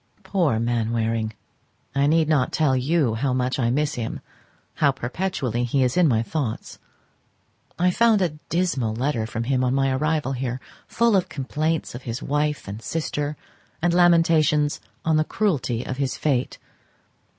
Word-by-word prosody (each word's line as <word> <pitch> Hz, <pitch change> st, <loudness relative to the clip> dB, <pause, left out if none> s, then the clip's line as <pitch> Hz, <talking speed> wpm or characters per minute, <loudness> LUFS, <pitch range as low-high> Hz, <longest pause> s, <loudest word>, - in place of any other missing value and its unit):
Poor 175 Hz, -, +1 dB
Mainwaring! 115 Hz, -1 st, -1 dB, 0.6 s
I 140 Hz, +1 st, +2 dB
need 160 Hz, +1 st, +3 dB
not 145 Hz, -5 st, +2 dB
tell 150 Hz, -4 st, +2 dB
you 135 Hz, -1 st, +1 dB
how 125 Hz, +4 st, 0 dB
much 125 Hz, +1 st, -1 dB
I 120 Hz, -2 st, +2 dB
miss 150 Hz, +4 st, 0 dB
him, 115 Hz, -5 st, -4 dB, 0.6 s
how 145 Hz, -, +4 dB
perpetually 130 Hz, -, -2 dB
he 130 Hz, +2 st, +1 dB
is 125 Hz, 0 st, 0 dB
in 180 Hz, -2 st, +5 dB
my 115 Hz, -5 st, +2 dB
thoughts. 130 Hz, -4 st, -4 dB, 1.0 s
I 180 Hz, +1 st, +3 dB
found 230 Hz, +1 st, +4 dB
a 180 Hz, -3 st, +2 dB, 0.2 s
dismal 140 Hz, -11 st, 0 dB
letter 120 Hz, -3 st, -1 dB
from 115 Hz, +1 st, -3 dB
him 130 Hz, +1 st, +1 dB
on 125 Hz, +1 st, +1 dB
my 135 Hz, 0 st, +2 dB
arrival 150 Hz, +1 st, 0 dB
here, 130 Hz, -1 st, -3 dB, 0.3 s
full 235 Hz, -2 st, +2 dB
of 185 Hz, -, +1 dB
complaints 155 Hz, +3 st, -2 dB
of 120 Hz, -, -7 dB
his 120 Hz, -1 st, -4 dB
wife 150 Hz, -1 st, -1 dB
and 100 Hz, +3 st, -6 dB
sister, 150 Hz, 0 st, -3 dB, 0.4 s
and 175 Hz, +1 st, +1 dB
lamentations 165 Hz, -, +3 dB, 0.2 s
on 160 Hz, -1 st, +3 dB
the 155 Hz, -, +3 dB
cruelty 145 Hz, -, -1 dB
of 130 Hz, -, -4 dB
his 135 Hz, -2 st, -1 dB
fate. 135 Hz, -4 st, 0 dB
140 Hz, 160 wpm, -23 LUFS, 120-160 Hz, 1.0 s, in